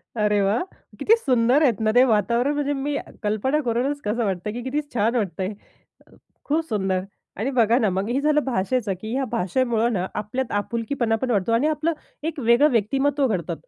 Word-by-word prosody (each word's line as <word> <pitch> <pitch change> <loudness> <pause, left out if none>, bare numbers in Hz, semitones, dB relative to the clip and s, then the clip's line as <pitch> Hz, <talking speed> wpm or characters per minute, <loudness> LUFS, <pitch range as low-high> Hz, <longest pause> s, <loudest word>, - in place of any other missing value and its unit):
अरे 210 -2 +2
वाह! 200 +4 +1 0.4
किती 450 - +5
सुंदर 255 - +2
आहेत 240 -9 +2
ना - - +4
ते 250 - +7
वातावरण. 235 +6 +2
म्हणजे 290 -1 -1
मी 285 +1 -2 0.3
कल्पना 215 +8 0
करूनच 250 +5 0
कसं 225 +3 0
वाटतं 190 +1 -2
की, 245 - -5
किती 280 +4 -1
छान 225 +2 +1
वाटतंय. 195 -3 -2 0.9
खूप 315 +3 0
सुंदर. 190 -3 0 0.4
आणि 230 +6 -1
बघा 230 +1 +4
ना 220 - +2
मग 190 +3 -2
हे 260 +3 +1
झालं 300 +1 +3
भाषेचं 235 -2 -1
की 220 +3 -6
ह्या 270 +1 0
भाषेमुळं 235 +5 +1
ना 185 -3 -1 0.2
आपल्यात 250 +4 -4
आपुलकीपणा 230 0 -1
पण 250 +3 -3
वाढतो. 210 0 +1
आणि 235 +6 +3
आपलं 310 +2 0 0.4
एक 315 - -9
वेगळं 285 +6 +5
व्यक्तिमत्त्व 270 +5 +1
घडतं. 175 -7 -2
235 Hz, 180 wpm, -23 LUFS, 210-270 Hz, 0.9 s, ते